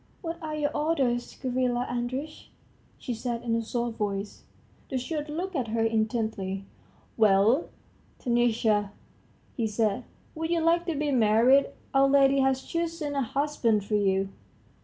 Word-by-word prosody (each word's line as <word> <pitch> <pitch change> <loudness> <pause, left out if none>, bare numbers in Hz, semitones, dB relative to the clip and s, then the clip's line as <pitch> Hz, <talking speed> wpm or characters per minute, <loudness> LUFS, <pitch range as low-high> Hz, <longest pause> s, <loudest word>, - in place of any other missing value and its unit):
"What 335 0 -5
are 310 -1 -4
your 295 -1 -1
orders, 275 -6 0
Gavrila 250 -1 0
Andreitch?" 255 +5 -4 0.5
she 250 - -4
said 235 0 -4
in 230 -1 0
a 230 - +1
soft 235 0 -3
voice. 200 -1 -3 0.4
The 265 - -1
steward 295 +4 -3
looked 355 +5 -4
at 255 -5 -1
her 225 +1 0
intently. 220 -4 -1 0.5
"Well, 215 - +4 0.5
Taniusha," 225 -4 +1 0.6
he 230 -3 0
said, 215 -1 0 0.3
"would 320 0 -3
you 340 -1 +2
like 335 +2 +2
to 335 - -1
be 295 0 0
married? 245 +3 +5 0.3
Our 270 0 +5
lady 275 0 +5
has 265 0 +2
chosen 330 -3 -3
a 280 - 0
husband 245 -5 0
for 215 - -5
you?" 195 -2 +2
245 Hz, 145 wpm, -27 LUFS, 220-290 Hz, 0.6 s, married